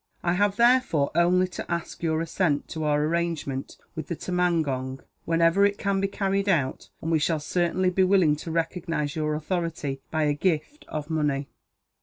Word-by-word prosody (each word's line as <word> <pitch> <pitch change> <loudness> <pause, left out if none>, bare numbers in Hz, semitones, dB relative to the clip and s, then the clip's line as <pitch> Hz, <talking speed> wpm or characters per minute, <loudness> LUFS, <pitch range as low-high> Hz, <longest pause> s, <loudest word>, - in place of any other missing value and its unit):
I 175 - +2
have, 200 +2 +2
therefore, 235 - +3
only 180 +2 +3
to 180 - -7
ask 170 -1 -3
your 160 -1 0
assent 165 -3 0
to 160 -2 -3
our 150 0 +2
arrangement 160 -5 -2 0.2
with 160 -3 -5
the 170 - -3
tumangong, 155 -8 -1 0.2
whenever 165 +3 +3
it 200 0 +3
can 200 -1 0
be 195 - +2
carried 195 0 -1
out; 145 -8 0
and 165 - -1
we 160 - +3
shall 155 +1 +1
certainly 180 +4 0
be 190 +1 +3
willing 185 -5 +4
to 165 - -7
recognize 165 -2 -2
your 155 -1 -1
authority, 155 -4 -3
by 155 -1 0
a 150 -1 +2
gift 170 - -1
of 155 +1 -5
money." 145 -3 0
165 Hz, 175 wpm, -26 LUFS, 150-185 Hz, 0.2 s, willing